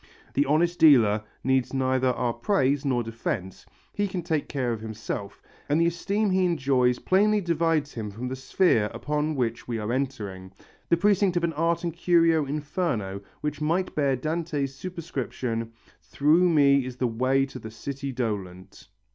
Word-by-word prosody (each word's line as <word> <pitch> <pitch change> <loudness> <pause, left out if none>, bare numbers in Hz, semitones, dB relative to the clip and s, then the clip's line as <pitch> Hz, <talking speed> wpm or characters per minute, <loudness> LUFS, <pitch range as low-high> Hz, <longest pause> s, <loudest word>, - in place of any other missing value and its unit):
The 145 +1 +2
honest 170 +4 +2
dealer 110 -9 +6 0.2
needs 130 +1 +1
neither 130 0 +1
our 125 -1 0
praise 135 - +1
nor 130 -4 0
defence, 115 - -5 0.3
he 205 0 0
can 185 -2 -4
take 160 -3 -1
care 125 -4 -1
of 110 - -6
himself, 110 -2 -6 0.3
and 150 +3 +3
the 170 - +4
esteem 200 +5 0
he 185 0 +2
enjoys 130 -7 +2
plainly 210 +6 +3
divides 165 -4 0
him 110 -3 -5
from 115 +5 -6
the 130 - -3
sphere 130 - +2
upon 150 +1 -1
which 120 -3 -2
we 120 -2 -2
are 110 +2 -2
entering, 105 -9 -4 0.4
the 170 - +4
precinct 195 -1 +2
of 175 - 0
an 170 -1 0
art 165 +2 0
and 170 -2 -2
curio 165 -3 +3
inferno 145 - -2 0.2
which 150 0 -3
might 170 +5 0
bear 140 -3 +1
Dante's 155 -1 -2
superscription: 130 -8 -4 0.3
"Through 160 +5 +3
me 140 -4 +4
is 125 0 -6
the 125 - 0
way 130 +4 +1
to 135 -1 -9
the 110 - -8
city 140 +5 -5
dolent." 100 -7 -5
140 Hz, 165 wpm, -26 LUFS, 120-165 Hz, 0.4 s, dealer